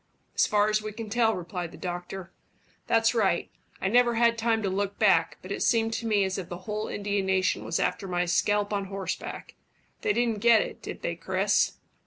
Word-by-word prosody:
"As - - +3
far 210 0 +3
as 215 0 +1
we 215 0 -6
can 215 -1 -7
tell," 225 -1 +3
replied 175 -1 -5
the - - -12
doctor. 180 +1 -6 0.6
"That's 225 +1 +3
right. 195 -7 +1 0.3
I - - -1
never 240 +3 +4
had 235 0 +4
time 225 -1 0
to - - 0
look 200 +1 -2
back, 170 -6 +3
but 185 - -8
it - - -3
seemed 225 -1 +2
to 225 0 -3
me 210 -2 +3
as 190 0 -1
if 180 - -7
the 175 - -5
whole 215 0 -3
Indian 200 -1 -2
nation 190 -1 +1
was 165 - -1
after 180 +2 -1
my 180 -1 0
scalp 205 +4 +1
on 200 -1 -1
horseback. 195 -1 -5 0.5
They - - +1
didn't 230 -1 0
get 230 0 +5
it, - - -9
did - - -8
they, - - -1
Chris?" - - +1
205 Hz, 210 wpm, -27 LUFS, 190-225 Hz, 0.6 s, get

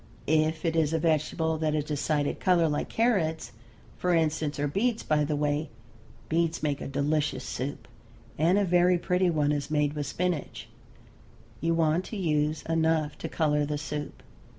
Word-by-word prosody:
If 155 +2 +1
it 165 -1 +1
is 160 -1 +2
a - - +2
vegetable 160 0 0
that 155 -1 0
has 150 - 0
a - - -17
decided 145 0 -1
color 175 -3 +3
like 150 -1 -2
carrots, 185 -9 0 0.5
for 180 -1 +2
instance, 155 -2 0
or 145 - +1
beets, 225 - 0
by 150 -1 +2
the 150 +1 -1
way, 145 0 -1 0.6
beets 165 -1 0
make 145 -2 -1
a - - -4
delicious 145 -1 -1
soup, 135 +3 -5 0.5
and 170 +6 +3
a 205 - +3
very 180 0 +4
pretty 180 +1 +1
one 150 -3 +1
is 145 0 -2
made 150 -1 +1
with 145 -2 -3
spinach, 180 -1 -3 0.9
you 165 0 +1
want 165 +1 +2
to 220 - -6
use 155 -4 0
enough 160 -2 +1
to - - -5
color 150 -2 +1
the 145 0 -2
soup. 150 0 -6
155 Hz, 175 wpm, -28 LUFS, 150-165 Hz, 0.9 s, very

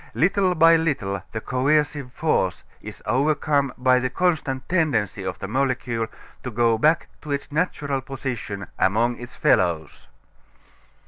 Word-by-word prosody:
Little 185 +2 +2
by 165 +1 +6
little 110 - -1
the 110 - -4
coercive 145 +1 0
force 125 - 0 0.2
is - - -10
overcome 140 +3 +1
by 125 0 +4
the 130 0 -1
constant 135 -5 -1
tendency 135 - 0
of 95 -1 -4
the 100 - -6
molecule 120 -1 -1 0.3
to 125 - -5
go 115 -1 +2
back 155 +6 +3
to 150 - -7
its 140 0 -3
natural 145 -4 -1
position 125 -7 -5
among 115 +5 +2
its 120 +1 -10
fellows. 85 -3 +1
130 Hz, 135 wpm, -23 LUFS, 115-150 Hz, 0.3 s, by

